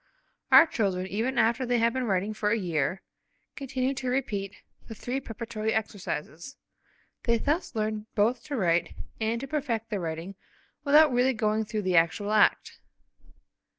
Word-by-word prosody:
Our - - +9
children, 195 - -1
even 225 +7 -2
after 235 +2 +2
they 245 -1 +1
have 230 0 +2
been 260 -1 -1
writing 200 0 0
for 210 -1 -1
a 225 - +2
year, 175 -1 -1 0.5
continue 265 -1 -2
to 260 -1 -4
repeat 215 -7 -2 0.3
the 225 - -8
three 250 +5 -3
preparatory 225 -2 -4
exercises. 205 - -4 0.7
They 235 -1 +3
thus 295 +2 -1
learn 215 0 -2
both 225 +4 +1
to 295 -2 -4
write, 175 -4 +1 0.2
and 225 +1 -1
to 275 - -5
perfect 240 -7 -3
their 205 - -1
writing, 165 +2 -5 0.5
without 295 -1 +5
really 250 +2 +3
going 220 -1 0
through 210 0 -3
the 185 -2 +2
actual 175 +5 +2
act. 215 - +2
220 Hz, 155 wpm, -27 LUFS, 200-250 Hz, 0.7 s, Our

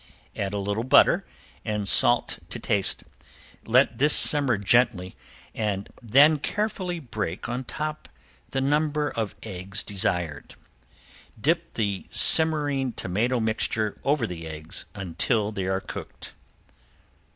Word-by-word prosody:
Add 100 -1 -3
a - - -2
little 100 +3 -3
butter 130 - +4 0.4
and 105 -2 -3
salt - - +5
to - - -6
taste. 100 -2 +1 0.6
Let - - +2
this 150 +2 +5
simmer 140 -7 +6
gently 100 -3 +1 0.4
and 100 -3 -3
then 140 +7 +4
carefully 190 0 -3
break 105 - -5
on 125 +2 -5
top 155 +4 -6 0.4
the 135 - -2
number 150 +1 0
of 110 -3 -4
eggs 95 0 -3
desired. 90 -6 -2 0.8
Dip 170 +7 -1
the 100 -4 -3
simmering 145 -5 +3
tomato 115 +8 -2
mixture 110 -1 -2
over 140 -3 0
the 85 -5 -7
eggs 80 +1 -6
until 105 +3 -2
they 95 -3 -4
are 95 0 -1
cooked. - - -10
110 Hz, 120 wpm, -24 LUFS, 100-145 Hz, 0.8 s, simmer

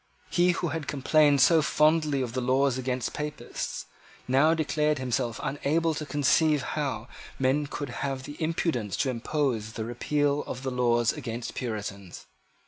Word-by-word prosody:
He, 180 0 +4
who 170 0 -2
had 155 -1 -4
complained 145 0 +3
so 165 +3 +6
fondly 150 -2 +2
of 120 -2 -5
the 130 - -1
laws 130 +1 +2
against 125 -1 -2
Papists, 150 0 -5 0.4
now 140 +6 +4
declared 150 -1 +1
himself 125 -2 -2
unable 150 +4 0
to 150 0 -5
conceive 145 0 +3
how 130 -8 -3 0.3
men 135 +3 +1
could 145 -1 -5
have 135 -2 -2
the 145 - -8
impudence 155 - -1
to 130 -1 +1
propose 120 -3 -1
the 110 - -4
repeal 145 +4 0
of 130 - -6
the 130 - -2
laws 120 -2 +2
against 115 +1 -5
Puritans. 100 -6 -5
135 Hz, 150 wpm, -27 LUFS, 125-150 Hz, 0.4 s, so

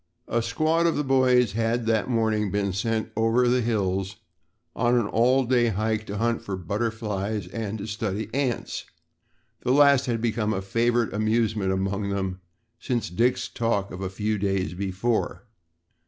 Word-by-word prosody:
A 120 - 0
squad 155 +8 +1
of 165 - +1
the 150 - 0
boys 130 -4 +3
had 115 +2 0
that 115 +1 +1
morning 110 -3 +1
been 100 -1 -1
sent 110 +2 -1
over 115 +3 +3
to 120 - +3
the 125 0 +3
hills 95 -4 -1 0.6
on 120 +1 +2
an 120 - +2
all 125 +5 +3
day 120 -1 +3
hike 110 +1 -1
to 100 - -4
hunt 115 +2 0
for 95 -2 -4
butterflies 105 +1 -2
and 110 +1 -4
to 100 - -6
study 105 -1 -3
ants 135 -3 -2 0.7
the 125 - -1
last 140 -1 +5
had 115 -2 0
become 110 -2 0
a 95 - -2
favorite 115 +3 +1
amusement 110 -2 +1
among 95 +1 -1
them 95 -2 -3 0.4
since 115 -5 -2
Dick's 120 +7 +1
talk 115 -4 -1
of 90 - -7
a 95 - -2
few 105 +2 -2
days 95 -4 -1
before. 100 +7 -2
110 Hz, 165 wpm, -25 LUFS, 100-120 Hz, 0.7 s, last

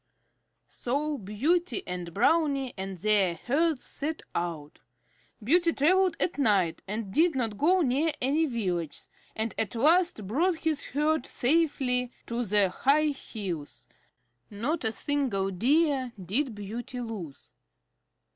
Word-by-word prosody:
So 285 +4 -2
Beauty 245 - 0
and 180 -1 -5
Brownie 275 - +2
and 190 -1 -5
their 195 -2 +2
herds 285 - 0
set 310 +2 -4
out. 165 -4 -4 0.6
Beauty 335 +8 +4
traveled 370 +5 +3
at 345 - -1
night 195 -10 +2
and 205 -1 -4
did 330 0 +3
not 230 -5 -1
go 355 - +3
near 290 +5 +1
any 295 +5 +1
villages, 180 - -3 0.3
and 220 0 -2
at 220 0 -1
last 320 - +3
brought 330 - +1
his 320 -2 -1
herd 300 0 0
safely 255 -4 +1 0.2
to 235 +1 -2
the 205 -2 +3
high 295 +9 +2
hills. 175 - -6 0.6
Not 250 +11 -2
a 220 - +1
single 225 -8 0
Deer 265 - +1
did 220 - -1
Beauty 225 +5 -6
lose. 210 - -7
245 Hz, 125 wpm, -28 LUFS, 200-305 Hz, 0.6 s, Beauty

